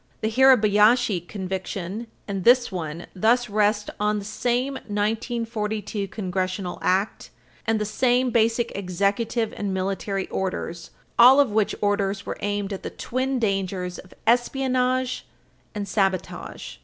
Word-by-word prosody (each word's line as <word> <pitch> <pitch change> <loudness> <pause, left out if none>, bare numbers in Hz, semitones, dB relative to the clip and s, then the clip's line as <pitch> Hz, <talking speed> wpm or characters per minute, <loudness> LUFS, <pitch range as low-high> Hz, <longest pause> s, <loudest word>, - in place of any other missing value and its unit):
The 220 - 0
Hirabayashi 220 -5 +4
conviction 190 +2 -4 0.2
and 195 -2 -3
this 245 +1 +5
one 165 -2 -5
thus 235 +4 +2
rest 210 0 +1
on 210 0 +1
the 200 - -5
same 245 +5 -1
1942 215 -2 -2
Congressional 185 -2 -3
Act 190 +3 0 0.4
and 225 -1 +2
the 210 - -1
same 245 +3 +2
basic 230 0 +1
executive 200 +4 -1
and 200 -2 -2
military 195 +1 -2
orders, 170 -3 -3 0.3
all 255 +4 +9
of 275 -6 +4
which 215 -1 +1
orders 200 -1 0
were - - -5
aimed 205 0 -2
at 195 - -5
the - - -5
twin 260 +2 -2
dangers 195 -5 -1
of 185 - -14
espionage 255 +1 +1 0.5
and 205 -1 -3
sabotage. 195 -2 -2
210 Hz, 130 wpm, -24 LUFS, 195-235 Hz, 0.5 s, all